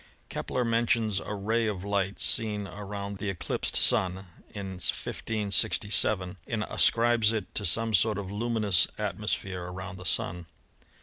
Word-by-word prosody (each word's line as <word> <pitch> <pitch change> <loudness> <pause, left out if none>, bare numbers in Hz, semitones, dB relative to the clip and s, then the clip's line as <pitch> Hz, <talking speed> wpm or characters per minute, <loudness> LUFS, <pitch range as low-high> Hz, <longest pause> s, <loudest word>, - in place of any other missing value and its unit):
Kepler 125 - -2
mentions 115 -3 +2
a 105 - -5
ray 110 +3 0
of 100 -4 -3
light 100 -1 -1
seen 105 -3 0
around 100 0 -6
the 100 0 -3
eclipsed 95 -3 -2
Sun 95 +1 +3 0.3
in 95 -3 -6
1567, 105 -3 0
and 110 -2 -1
ascribes 115 -2 +4
it 110 -4 -4
to 105 - +1
some 115 +5 +2
sort 105 +2 +3
of 100 -2 -5
luminous 105 -4 +2
atmosphere 95 -2 -3
around 95 +1 -7
the 90 - -9
Sun. 85 -1 0
100 Hz, 135 wpm, -28 LUFS, 95-110 Hz, 0.3 s, ascribes